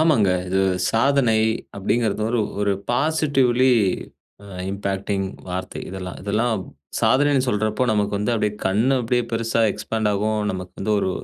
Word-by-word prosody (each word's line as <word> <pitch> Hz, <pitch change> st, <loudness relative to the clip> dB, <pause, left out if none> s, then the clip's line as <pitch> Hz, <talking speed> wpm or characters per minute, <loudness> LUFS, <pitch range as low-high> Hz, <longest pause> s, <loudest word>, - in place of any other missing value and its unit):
ஆமாங்க. 130 Hz, -, +4 dB, 0.2 s
இது 95 Hz, +1 st, +1 dB, 0.3 s
சாதனை 120 Hz, -1 st, +3 dB, 0.4 s
அப்டிங்கிறது 105 Hz, +1 st, 0 dB
ஒரு 120 Hz, -, +1 dB, 0.2 s
ஒரு 100 Hz, -1 st, +2 dB, 0.2 s
பாசிட்டிவ்லி 130 Hz, -3 st, +2 dB, 0.7 s
அ -, -, -12 dB, 0.2 s
இம்பாக்டிங் 100 Hz, 0 st, -2 dB, 0.2 s
வார்த்தை 90 Hz, +1 st, -4 dB
இதெல்லாம் 90 Hz, -1 st, -6 dB
இதெல்லாம் 110 Hz, +4 st, 0 dB, 0.5 s
சாதனைன்னு 140 Hz, -1 st, +3 dB
சொல்றப்போ 110 Hz, +2 st, 0 dB
நமக்கு. 105 Hz, -1 st, 0 dB
வந்து 105 Hz, +4 st, 0 dB
அப்டியே 105 Hz, -2 st, 0 dB
கண்ணு 110 Hz, +8 st, +2 dB
அப்டியே 120 Hz, +1 st, +1 dB
பெருசா 115 Hz, 0 st, 0 dB
எக்ஸ்பாண்ட்டாகும் 110 Hz, -1 st, -1 dB
நமக்கு 90 Hz, -1 st, -6 dB
வந்து 105 Hz, +2 st, 0 dB
ஒரு 95 Hz, -, 0 dB
110 Hz, 130 wpm, -22 LUFS, 100-125 Hz, 0.7 s, ஆமாங்க